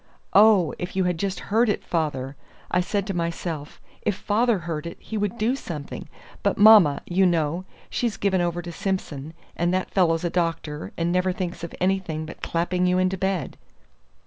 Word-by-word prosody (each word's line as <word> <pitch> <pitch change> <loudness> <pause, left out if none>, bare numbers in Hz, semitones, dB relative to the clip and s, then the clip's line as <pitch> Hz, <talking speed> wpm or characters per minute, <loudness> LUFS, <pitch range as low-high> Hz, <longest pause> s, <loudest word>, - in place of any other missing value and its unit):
"Oh, 205 -5 +6
if 180 +1 -5
you 190 - +2
had 180 -2 0
just 195 -1 -2
heard 230 +1 +4
it, 205 - -1
father! 145 -5 -2 0.4
I 180 - +3
said 200 +2 -1
to 195 - -3
myself, 170 -3 -4 0.2
if 205 - 0
father 220 +3 +1
heard 165 -1 -3
it - - -8
he 220 - -7
would 210 +2 -1
do 235 +4 +1
something; 155 - -7 0.3
but - - +1
mamma, 205 -9 +7
you 185 +2 +2
know, 170 +1 0 0.2
she's 235 -4 -2
given 190 -2 +1
over 175 0 -1
to 175 - -6
Simson, 160 -5 -4 0.2
and 175 +1 +1
that 185 - -2
fellow's 165 -3 +2
a 175 - -1
doctor, 165 -3 -2
and 170 +1 0
never 180 +1 +2
thinks 180 -2 -4
of 170 - -6
anything 180 -4 0
but 155 - -10
clapping 180 +2 0
you 180 0 +2
into 185 +1 +2
bed." 190 -1 -2
180 Hz, 185 wpm, -24 LUFS, 165-195 Hz, 0.4 s, mamma